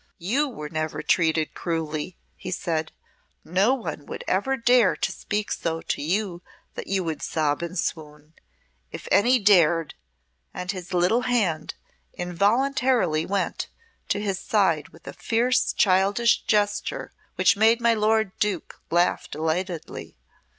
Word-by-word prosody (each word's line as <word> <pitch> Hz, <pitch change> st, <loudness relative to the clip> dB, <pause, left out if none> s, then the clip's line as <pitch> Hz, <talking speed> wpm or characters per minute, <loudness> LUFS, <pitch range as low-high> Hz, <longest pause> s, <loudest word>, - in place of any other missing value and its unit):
"You 260 Hz, -, 0 dB
were 150 Hz, -, -7 dB
never 155 Hz, -1 st, -3 dB
treated 160 Hz, -2 st, +1 dB
cruelly," 160 Hz, 0 st, -3 dB, 0.2 s
he 185 Hz, -, -8 dB
said. 165 Hz, -3 st, -2 dB, 0.5 s
"No 195 Hz, +10 st, +2 dB
one 160 Hz, -, -6 dB
would -, -, -6 dB
ever 265 Hz, +9 st, +1 dB
dare 240 Hz, -4 st, +4 dB
to -, -, -2 dB
speak 210 Hz, 0 st, -3 dB
so 165 Hz, -1 st, -2 dB
to -, -, -3 dB
you 180 Hz, +2 st, -1 dB, 0.3 s
that -, -, -7 dB
you 190 Hz, -1 st, 0 dB
would 160 Hz, -2 st, -4 dB
sob 150 Hz, -2 st, -1 dB
and 170 Hz, +2 st, -5 dB
swoon. 150 Hz, -2 st, -5 dB, 0.6 s
If -, -, -8 dB
any 245 Hz, +5 st, +5 dB
dared!" 170 Hz, -7 st, +4 dB, 0.6 s
and 180 Hz, +1 st, -3 dB
his 185 Hz, -2 st, -8 dB
little 180 Hz, +7 st, +2 dB
hand 205 Hz, -11 st, 0 dB, 0.4 s
involuntarily 200 Hz, -, +1 dB
went 200 Hz, 0 st, -2 dB, 0.4 s
to -, -, +1 dB
his 200 Hz, -2 st, -2 dB
side 165 Hz, -7 st, +1 dB
with 165 Hz, -, -19 dB
a -, -, -6 dB
fierce 245 Hz, +2 st, +1 dB
childish 200 Hz, +5 st, +3 dB
gesture 205 Hz, -1 st, 0 dB, 0.2 s
which -, -, +4 dB
made 225 Hz, +3 st, +4 dB
my 235 Hz, -1 st, +3 dB
lord 220 Hz, -1 st, +2 dB
Duke 205 Hz, -5 st, -2 dB
laugh 175 Hz, +1 st, +1 dB
delightedly. 160 Hz, +2 st, -4 dB
185 Hz, 135 wpm, -25 LUFS, 165-220 Hz, 0.6 s, any